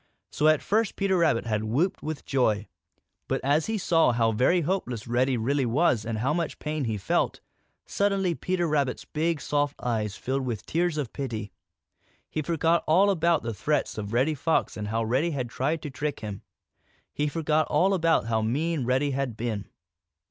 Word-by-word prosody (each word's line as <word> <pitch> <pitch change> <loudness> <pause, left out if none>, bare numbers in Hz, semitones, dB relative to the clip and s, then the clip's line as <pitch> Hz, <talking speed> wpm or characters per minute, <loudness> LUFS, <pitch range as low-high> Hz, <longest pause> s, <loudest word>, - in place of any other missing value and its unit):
So 150 - +2
at 155 -1 +4
first 220 0 +1
Peter 195 -1 +1
Rabbit 165 -10 +2
had 110 -2 -1
whooped 145 - 0
with 155 -1 -5
joy. 110 -6 +1 0.6
But - - 0
as 145 +3 +2
he 220 0 -1
saw 165 -7 +3
how 115 -1 +2
very 130 +11 +3
helpless 145 - -2
Reddy 125 +2 +1
really 130 +3 0
was 120 -3 +2
and 115 -1 -2
how 130 +7 0
much 170 -1 -2
pain 150 -2 -3
he 110 -2 -1
felt, 95 - 0 0.5
suddenly 195 -3 +1
Peter 175 +1 -1
Rabbit's 140 -4 0
big, 160 +1 -1
soft 145 0 -1
eyes 110 -4 -2
filled 135 +1 -2
with 115 -5 -4
tears 170 -1 0
of 140 -6 -3
pity. 110 -7 -4 0.8
He 155 - -1
forgot 165 +1 +1
all 190 +6 +5
about 170 -3 +2
the 115 0 -3
threats 145 +9 -1
of 105 -1 -5
Reddy 130 +7 +2
Fox 160 +3 0
and 105 -1 -4
how 115 +2 0
Reddy 130 +9 +1
had 130 -6 -3
tried 150 +5 -1
to 150 - -5
trick 145 +2 -3
him. 105 -3 -6 0.7
He 150 +1 0
forgot 155 0 +1
all 185 +6 +3
about 165 -7 +2
how 110 -1 0
mean 145 +5 0
Reddy 130 +3 +1
had 130 -4 -2
been. 110 -4 -3
145 Hz, 185 wpm, -27 LUFS, 115-165 Hz, 0.8 s, all